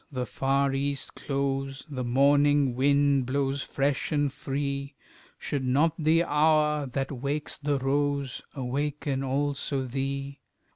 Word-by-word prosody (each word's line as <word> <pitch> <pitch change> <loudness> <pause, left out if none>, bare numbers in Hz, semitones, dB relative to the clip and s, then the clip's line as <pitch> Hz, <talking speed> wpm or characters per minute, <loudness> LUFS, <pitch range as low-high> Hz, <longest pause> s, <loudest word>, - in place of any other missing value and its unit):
The 130 -2 -2
far 135 +1 +1
east 140 0 -2
glows, 135 0 -2
The 135 -4 -4
morning 140 +2 +4
wind 140 0 +3
blows 135 +1 0
fresh 140 +3 -1
and 145 -3 +1
free 140 0 -3 0.4
Should 140 -2 -3
not 145 +5 +3
the 165 +1 +3
hour 150 -2 +2
that 135 +2 -3
wakes 140 +3 -3
the 145 -1 0
rose 140 0 -1
Awaken 140 +1 -2
also 140 0 -1
thee? 135 +2 -4
140 Hz, 125 wpm, -27 LUFS, 135-145 Hz, 0.4 s, morning